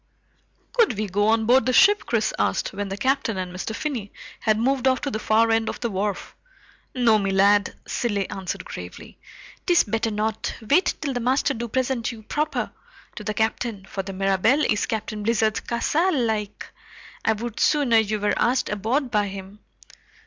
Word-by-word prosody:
"Could 455 - +3
we 215 - -1
go 205 +2 0
on 220 0 +3
board 255 +3 +4
the 255 - +2
ship?" 410 +8 +5
Chris - - 0
asked, - - 0
when 200 0 -4
the 195 - -4
Captain 260 -4 0
and 180 -1 -4
Mr. 195 +4 -4
Finney 240 -10 -4 0.3
had 215 -1 +2
moved 260 +3 +1
off 260 0 +3
to 280 - -2
the 215 - -2
far 225 +1 +3
end 225 0 +1
of - - -6
the 235 - -2
wharf. 200 +1 -3 0.6
"No, 235 -4 +4
me 195 -1 -1
lad," 200 +1 +3
Cilley 205 -5 -1
answered 190 - -5
gravely. - - -9 0.5
"'Tis 350 -1 +5
better 225 +2 -1
not. 215 +1 -2
Wait 330 - +3
till 280 -3 -2
the 245 - -2
master 255 +3 +1
do 235 +1 -4
present 250 0 -1
you 225 -2 -11
proper 300 +7 -2 0.4
to 215 - -7
the 210 0 -3
Captain, 220 -2 -1
for 195 - -4
the 195 +1 -7
Mirabelle 195 +9 +2
is 210 -1 0
Captain 215 -1 -3
Blizzard's 220 0 +1
castle, 300 +7 0
like. 215 -3 -2 0.5
I 220 - +3
would 225 +1 -6
sooner 270 -7 +4
ye 215 -1 0
were 210 0 0
asked 255 +2 +1
aboard 230 +6 -1
by 210 -2 +1
him." 195 +1 -9
220 Hz, 185 wpm, -24 LUFS, 205-255 Hz, 0.6 s, ship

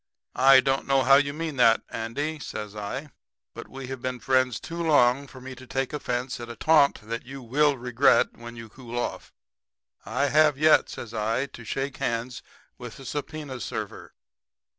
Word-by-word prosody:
"'I 135 0 +7
don't 135 +1 0
know 135 -1 +3
how 135 +2 +7
you 140 0 +1
mean 155 -1 -5
that, 115 -2 +5
Andy,' 145 +8 -3
says 105 -5 -7
I, 135 +8 -5 0.4
'but - - -9
we 135 0 -8
have 135 -2 -6
been 125 -1 -3
friends 130 -3 +1
too 170 +1 -6
long 140 -4 +3
for 130 - -13
me 130 +1 -8
to 130 0 -13
take 135 +2 -2
offense 125 -3 -3
at 120 0 -7
a 115 - -7
taunt 150 +3 +3
that 115 +2 -5
you 135 +1 -9
will 145 +4 +2
regret 125 +2 +3
when 120 0 -10
you 115 -1 -9
cool 120 +1 -9
off. 120 - -4 0.7
I 140 +5 0
have 150 -1 +4
yet,' 155 +2 +4
says 115 -1 -8
I, 115 +4 0
'to 120 -4 -12
shake 135 +5 -3
hands 125 -1 -3 0.4
with 120 -4 -9
a 135 - -11
subpoena 145 -1 -5
server.' - - -6
130 Hz, 185 wpm, -26 LUFS, 120-140 Hz, 0.7 s, I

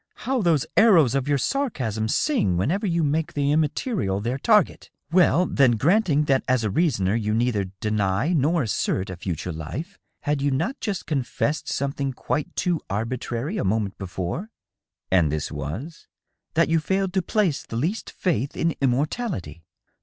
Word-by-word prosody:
" - - -59
How 260 -1 +1
those 160 -6 +2
arrows 175 - +6
of 135 0 0
your 145 -1 +2
sarcasm 125 - -1
sing 110 - +1
whenever 180 - 0
you 170 -2 +1
make 155 +2 0
the 145 0 +1
immaterial 150 - 0
their 120 +6 -2
target!.. 210 +5 +2 0.2
Well, 180 -1 +4
then, 135 -7 +3
granting 150 - +3
that 135 -3 +2
as 130 -2 +2
a 105 - 0
reasoner 110 - +1
you 110 -1 0
neither 115 -4 +1 0.2
deny 105 - +1
nor 160 +1 +2
assert 95 -3 -1
a - - -5
future 90 -1 -4
life, 125 - -6 0.2
had 145 -2 -1
you 145 - +2
not 165 - -1
just 205 -6 -3
confessed 145 0 -1
something 140 0 -2
quite 145 +3 -3
too 175 -3 0
arbitrary 120 - -3
a - - 0
moment 100 0 0
before 95 - -4 0.3
?" - - -57
"And 85 -6 +4
this 75 -1 -2
was. 85 - -6 0.2
.?" - - -56
That 165 +1 +4
you 165 0 +2
failed 190 +3 -1
to 190 - +2
place 190 -6 0
the - - -8
least 175 - -2
faith 145 - -2
in 165 -1 +1
immortality." 135 - -1
140 Hz, 170 wpm, -24 LUFS, 110-170 Hz, 0.3 s, arrows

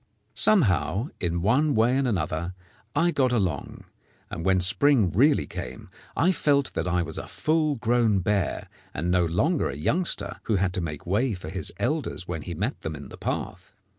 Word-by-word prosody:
Somehow, 110 - +2
in 85 -1 -1
one 140 +8 +2
way 115 +3 +3
and 135 -1 +1
another, 85 -3 -2 0.4
I 175 +1 +3
got 130 -5 +1
along, 95 - -2 0.5
and 85 - -5
when 95 0 +3
spring 105 - +3
really 140 - +3
came 65 0 -8 0.3
I 180 - +4
felt 140 -5 +1
that - - -2
I 90 -1 +1
was - - -5
a - - -7
full 155 -1 0
grown 115 -3 +2
bear, 100 0 -1 0.3
and 85 +5 -1
no 90 -1 +3
longer 115 - +1
a 70 - -5
youngster 165 - +1
who 110 - +1
had 95 -1 0
to 95 - -1
make 75 -4 -5
way 105 +5 +1
for 90 - -8
his - - -2
elders 145 - -2
when 80 -3 -4
he - - -6
met - - -3
them 80 -1 -4
in 70 -1 -10
the - - -10
path. - - -5
100 Hz, 185 wpm, -26 LUFS, 85-140 Hz, 0.5 s, I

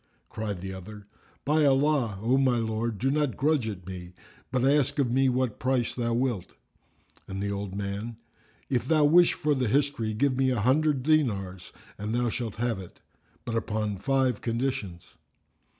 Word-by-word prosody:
Cried 105 -4 -4
the 95 0 -5
other, 100 +3 -10 0.4
"By 155 +2 +3
Allah, 135 -6 +2
O 120 +3 +3
my 130 -2 +3
lord, 110 -1 -2
do 135 +6 +1
not 150 -2 0
grudge 145 -4 +2
it 95 -5 -6
me, 90 -1 -8 0.4
but 130 -1 +1
ask 145 0 +2
of 135 -4 +1
me 135 +1 +3
what 125 -2 -1
price 130 -2 0
thou 115 -2 -1
wilt." 120 -7 -2 0.7
And 95 0 -5
the 100 0 -2
old 100 -1 -4
man, 100 +3 -4 0.5
"If 125 -2 -1
thou 155 -1 +4
wish 170 +4 +6
for 150 -1 0
the 130 -3 0
history 135 -3 0
give 135 +3 +2
me 130 0 +2
an 125 - 0
hundred 135 +4 +2
dinars 100 - 0 0.3
and 105 +3 -2
thou 120 0 +1
shalt 115 -4 -4
have 115 -2 -1
it; 90 -2 -11 0.5
but 115 - -3
upon 110 -3 -2
five 130 +1 +1
conditions." 115 -7 -2
120 Hz, 170 wpm, -27 LUFS, 105-135 Hz, 0.7 s, wish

